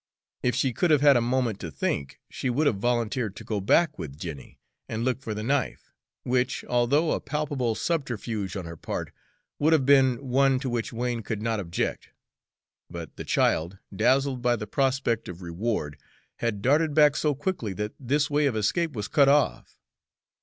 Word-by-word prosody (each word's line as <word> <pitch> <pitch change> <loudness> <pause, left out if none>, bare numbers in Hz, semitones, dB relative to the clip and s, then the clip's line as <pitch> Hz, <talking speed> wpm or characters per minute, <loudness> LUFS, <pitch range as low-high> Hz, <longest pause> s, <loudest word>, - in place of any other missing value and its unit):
If 125 - +1
she 130 -3 +1
could 175 +9 +1
have 150 -3 +4
had 145 -1 +7
a 120 - +4
moment 120 -3 0
to 85 - -5
think, 70 -1 -3
she 130 - -3
would 140 +6 +1
have 120 -8 +2
volunteered 120 -1 -1
to 110 - -9
go 105 -2 -2
back 155 - +3
with 70 -2 -6
Jenny 80 -5 -8 0.3
and 115 +1 -2
look 130 0 0
for 110 -4 -4
the 105 - -4
knife, 135 +3 -1 0.3
which, 125 +1 0
although 130 +7 +2
a - - 0
palpable 145 -5 -2
subterfuge 115 - -2
on 95 - -5
her 85 0 -7
part, - - -5 0.5
would 155 +2 +4
have 145 -5 +3
been 135 -2 +5
one 135 +1 +2
to 130 -3 -2
which 120 -2 -2
Wain 120 0 -2
could 110 -1 -4
not 115 -1 0
object; 85 -4 -3 0.8
but 85 -3 -8
the - - -6
child, 85 +5 +1 0.2
dazzled 130 +3 +2
by 120 0 +2
the 105 -2 -5
prospect 130 -1 0
of 90 +1 -8
reward, 85 -3 -3 0.4
had 105 -4 -2
darted 150 +3 +3
back 150 -2 +6
so 150 -2 +1
quickly 145 - -3
that 105 +3 -3
this 140 +3 +1
way 150 -1 +2
of 130 - -1
escape 150 - 0
was 105 -4 -4
cut 140 -2 +4
off. 140 - +1
120 Hz, 185 wpm, -26 LUFS, 105-140 Hz, 0.8 s, had